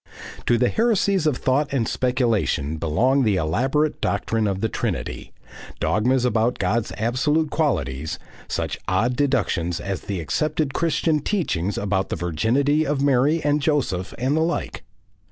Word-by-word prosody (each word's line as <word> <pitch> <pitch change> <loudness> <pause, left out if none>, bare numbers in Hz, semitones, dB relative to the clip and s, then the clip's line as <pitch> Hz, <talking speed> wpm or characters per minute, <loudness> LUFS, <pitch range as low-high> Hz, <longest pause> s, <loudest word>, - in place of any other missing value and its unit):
To 120 - +4
the 125 +1 +2
heresies 200 -6 +2
of 145 -5 +1
thought 140 +3 +1
and 125 -5 0
speculation 115 - 0
belong 120 - +2
the 110 -6 +2
elaborate 130 - 0
doctrine 105 +3 0
of 95 -1 -1
the 110 - 0
Trinity, - - -4 0.5
dogmas 125 +4 +1
about 120 0 +1
God's 105 +4 0
absolute 145 +8 +1
qualities, 75 - -1 0.3
such - - -3
odd 115 +7 +1
deductions 105 - 0
as 100 -2 -4
the 100 -3 -4
accepted 150 - -1
Christian 160 -1 +1
teachings 105 - -1
about 95 -1 -1
the - - -2
virginity 115 - +1
of 145 -2 -1
Mary 140 +4 +3
and 145 0 +2
Joseph, 140 - -1
and 130 +4 0
the 160 - +2
like. 170 +2 -2
125 Hz, 145 wpm, -23 LUFS, 100-150 Hz, 0.5 s, To